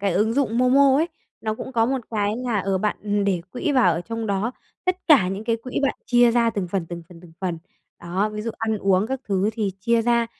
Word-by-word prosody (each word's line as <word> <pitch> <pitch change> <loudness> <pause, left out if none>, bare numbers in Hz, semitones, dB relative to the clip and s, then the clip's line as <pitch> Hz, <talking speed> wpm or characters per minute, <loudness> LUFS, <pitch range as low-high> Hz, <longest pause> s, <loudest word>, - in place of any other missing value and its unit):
cái 195 -2 +1
ứng 215 +5 +2
dụng 245 -4 +1
MoMo 265 +2 +5
ấy, 325 +3 +1 0.3
nó 215 -1 -2
cũng 260 +4 -7
có 225 -1 +3
một 265 +1 0
cái 205 -2 0
là, 245 -4 -1
ờ, 195 0 0
bạn 205 0 -1
để 190 -3 +1
quỹ 285 +4 -1
vào 250 -10 +4
ở 165 - -2
trong 225 +5 -4
đó, 200 +4 -1 0.3
tất 365 0 +1
cả 270 - +6
những 195 +3 -4
cái 230 -1 +1
quỹ 250 +3 -4
bạn 275 - +2
chia 240 -1 +5
ra 235 0 +3
từng 200 -5 -3
phần, 180 -2 -2
từng 170 0 -7
phần, 170 -2 -14
từng 170 -2 -15
phần. 175 -3 -2 0.4
Đó, 185 +5 -1
ví 210 - -4
dụ 230 - -2
ăn 220 -1 0
uống 195 +1 +2
các 265 +1 -3
thứ 195 +1 +1
thì 215 -3 -1
chia 230 +3 +2
ra. 235 0 +2
220 Hz, 250 wpm, -23 LUFS, 195-240 Hz, 0.4 s, cả